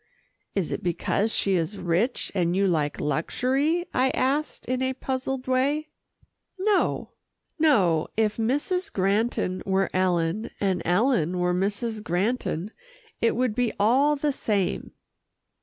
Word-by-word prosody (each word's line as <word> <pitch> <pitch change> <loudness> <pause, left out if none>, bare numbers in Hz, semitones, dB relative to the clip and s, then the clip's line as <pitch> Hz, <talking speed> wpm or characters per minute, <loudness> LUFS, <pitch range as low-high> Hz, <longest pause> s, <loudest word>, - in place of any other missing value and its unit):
"Is 190 -5 -1
it - - -3
because 195 +5 0
she 195 - +1
is 180 +3 -1
rich, 185 +7 0
and 175 -2 +1
you 195 +1 +2
like 155 -5 0
luxury?" 265 - 0
I 260 +1 +3
asked 285 +4 -1
in 255 0 -1
a 260 0 +1
puzzled 260 0 -3
way. 280 +4 +1 0.7
"No, 400 +1 +1 0.5
no. 190 - +3
If 215 -1 +1
Mrs. 290 +11 -1
Granton 195 -1 0
were 195 0 0
Ellen, 180 +2 +1
and 190 -3 0
Ellen 180 - +2
were 180 0 +1
Mrs. 210 +4 -1
Granton, 195 0 -1 0.5
it 230 - +2
would 250 -2 +1
be 245 0 0
all 265 +8 +4
the 290 0 0
same." 200 -7 -1
215 Hz, 130 wpm, -25 LUFS, 180-260 Hz, 0.7 s, all